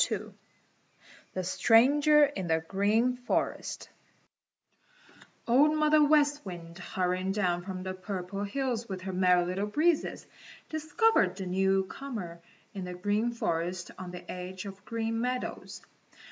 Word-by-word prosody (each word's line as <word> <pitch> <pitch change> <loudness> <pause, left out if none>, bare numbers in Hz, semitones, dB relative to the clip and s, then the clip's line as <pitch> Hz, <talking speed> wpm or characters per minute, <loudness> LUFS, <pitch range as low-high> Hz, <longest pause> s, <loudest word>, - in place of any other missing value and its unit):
II - - -4 1.0
THE 185 - -1
STRANGER 280 - +5
IN 195 -11 -4
THE 160 -1 +1
GREEN 220 +7 +2
FOREST 245 - -2 1.6
Old 290 +6 +4
Mother 305 0 +5
West 295 0 +3
Wind, 175 -2 -9
hurrying 185 +1 -1
down 180 -4 0
from 185 0 -6
the 185 0 -4
Purple 185 +1 -5
Hills 235 +1 -2
with 190 -1 -5
her 190 0 -5
Merry 180 -1 +4
Little 190 +3 -2
Breezes, 310 +8 +1 0.4
discovered 315 - +2
the 190 -1 -5
newcomer 190 +1 -1 0.3
in 195 -2 -5
the 180 0 -6
Green 205 +5 0
Forest 175 -4 -2
on 185 - -6
the 180 0 -9
edge 185 +1 -6
of 195 -1 -7
the - - -27
Green 225 0 -2
Meadows. 250 +1 -4
195 Hz, 130 wpm, -29 LUFS, 180-250 Hz, 1.6 s, STRANGER